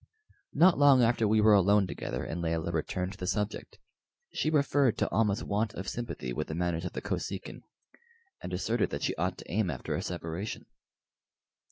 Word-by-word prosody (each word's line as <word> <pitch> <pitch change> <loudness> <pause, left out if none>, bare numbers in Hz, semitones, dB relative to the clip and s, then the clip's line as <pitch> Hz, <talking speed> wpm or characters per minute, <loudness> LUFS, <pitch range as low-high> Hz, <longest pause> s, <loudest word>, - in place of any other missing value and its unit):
Not 175 -2 +5
long 140 -3 +6
after 115 -1 +2
we 110 +1 +3
were 110 0 +6
alone 100 +1 +5
together, 65 -8 -4
and 85 - -4
Layelah 85 0 -1
returned 90 +3 -2
to 100 - -11
the 90 - -4
subject. 105 +2 -3 0.6
She 155 - 0
referred 140 -4 +2
to - - 0
Almah's 105 0 +1
want 105 +1 -1
of 95 - -6
sympathy 110 - -4
with 75 - -3
the 80 - -4
manners 85 0 -1
of - - -5
the - - -5
Kosekin, - - -4 0.8
and - - -6
asserted 110 +5 0
that 70 - -4
she - - +1
ought - - -1
to - - -11
aim 100 0 +1
after 65 -6 -4
a - - -1
separation. 85 +4 -5
100 Hz, 185 wpm, -30 LUFS, 85-115 Hz, 0.8 s, long